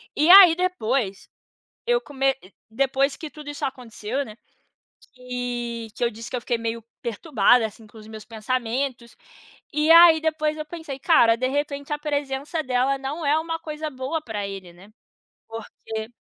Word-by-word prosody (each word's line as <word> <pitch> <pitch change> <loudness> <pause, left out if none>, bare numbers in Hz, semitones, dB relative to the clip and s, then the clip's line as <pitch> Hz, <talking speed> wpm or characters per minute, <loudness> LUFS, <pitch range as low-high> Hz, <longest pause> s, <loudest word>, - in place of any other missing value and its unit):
E 305 +3 +2
aí 370 -3 +10
depois, 260 - -1 0.6
eu 485 0 +2
come 270 - 0 0.3
depois 270 +3 +1
que 315 - -8
tudo 300 -1 -10
isso 290 - -4
aconteceu 250 0 -4
né, 215 - -11 0.8
que 245 -2 -5
que - - -3
eu 235 - +3
disse 230 +1 -9
que - - -4
eu 245 - -3
fiquei 235 - -1
meio 230 0 -4 0.2
perturbada, 235 -1 +2
assim, 220 +1 -15
com 215 +1 -17
os 215 0 -12
meus 220 -1 -10
pensamentos, 240 +2 -3 0.6
e 300 +2 +3
aí 335 -1 +9
depois 310 -1 -1
eu 305 - -5
pensei: 305 -4 -8
"Cara 240 -8 +5
de 255 +2 0
repente 285 +1 -3
a 295 - -3
presença 290 +1 -3
dela 255 +1 +1
não 280 +4 -5
é 290 +2 +3
uma 325 0 -4
coisa 310 0 -5
boa 270 +4 -4
pra 210 -7 -5
ele 190 -3 -9
,né?" 185 +4 -17 0.6
Porque,, 220 0 -7
265 Hz, 165 wpm, -24 LUFS, 230-300 Hz, 0.8 s, aí